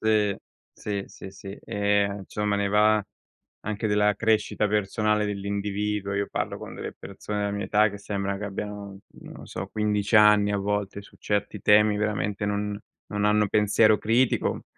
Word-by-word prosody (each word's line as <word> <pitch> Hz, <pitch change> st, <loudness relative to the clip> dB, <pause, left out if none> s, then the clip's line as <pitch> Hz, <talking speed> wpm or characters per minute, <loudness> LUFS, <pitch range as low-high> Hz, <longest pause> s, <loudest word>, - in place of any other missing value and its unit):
Sì, 105 Hz, -2 st, +2 dB, 0.4 s
sì, 100 Hz, -1 st, -4 dB
sì, 95 Hz, -, -11 dB
sì. 95 Hz, +1 st, -9 dB
Ehm, 100 Hz, -1 st, +1 dB
insomma 105 Hz, -1 st, -1 dB
ne 100 Hz, -, 0 dB
va 105 Hz, +1 st, +4 dB, 0.6 s
anche 110 Hz, +1 st, -3 dB
della 105 Hz, 0 st, +2 dB
crescita 110 Hz, -1 st, +1 dB
personale 105 Hz, +1 st, +1 dB
dell'individuo. 100 Hz, 0 st, -2 dB
Io 100 Hz, 0 st, 0 dB
parlo -, -, -3 dB
con -, -, -9 dB
delle -, -, -6 dB
persone 105 Hz, +1 st, -6 dB
della 100 Hz, 0 st, -1 dB
mia 100 Hz, 0 st, -3 dB
età 105 Hz, +1 st, +4 dB
che 100 Hz, -, -8 dB
sembra 100 Hz, -1 st, -3 dB
che 105 Hz, -, -6 dB
abbiano, 100 Hz, 0 st, -6 dB, 0.2 s
non -, -, -11 dB
lo -, -, -11 dB
so, -, -, -6 dB
15 105 Hz, -1 st, -1 dB
anni 105 Hz, -1 st, +6 dB
a -, -, +1 dB
volte, 100 Hz, 0 st, -2 dB
su 100 Hz, -, -18 dB
certi 105 Hz, 0 st, -2 dB
temi 105 Hz, 0 st, +5 dB
veramente 105 Hz, -1 st, -1 dB
non 105 Hz, 0 st, -2 dB, 0.3 s
non 105 Hz, 0 st, -2 dB
hanno 105 Hz, 0 st, +3 dB
pensiero 105 Hz, +1 st, +4 dB
critico 115 Hz, +3 st, +1 dB
105 Hz, 165 wpm, -26 LUFS, 100-105 Hz, 0.6 s, anni